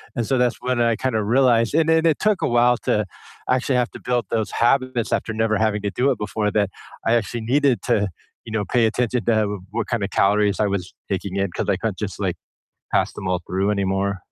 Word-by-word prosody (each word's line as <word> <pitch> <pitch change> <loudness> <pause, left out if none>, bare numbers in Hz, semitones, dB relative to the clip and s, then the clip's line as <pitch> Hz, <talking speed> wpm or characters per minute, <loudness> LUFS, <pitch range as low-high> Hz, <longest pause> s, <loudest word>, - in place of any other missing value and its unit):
and 120 - -1
so 135 - +1
that's 125 -1 +1
when 125 -1 -1
I 115 -1 +3
kinda 110 -2 -1
realized 120 +1 +3
and 160 0 +3
then 160 0 +3
it 160 -3 +3
took 210 -2 +1
a - - +1
while 120 0 +3
to 105 -1 +1 0.4
actually 130 +1 +1
have 125 -1 +1
to - - -10
build 120 -3 0
those 110 -2 -1
habits 130 -1 +1
after 110 - -1
never 110 -1 +1
having 105 -1 +1
to 100 - -1
do 135 +6 +1
it - - -1
before 105 0 -1
that 100 -1 +1 0.4
I 115 - +4
actually 115 +1 -1
needed 130 -1 +2
to, 100 -1 +1 0.4
you 115 - -8
know, 110 - 0
pay 120 -2 +2
attention 120 0 0
to, 110 -2 +3
uh, - - -6
what 110 0 -3
kinda 110 -5 -1
calories 105 +1 +2
I 105 - +2
was 95 -2 -3 0.2
taking 95 0 -3
in, 100 -1 0
'cause - - -3
I - - +3
couldn't - - -3
just, - - -5
like, - - 0 0.6
pass - - +2
them 95 - -5
all 90 -1 0
through 95 +2 0
anymore. 100 -1 -1
115 Hz, 230 wpm, -22 LUFS, 105-125 Hz, 0.6 s, I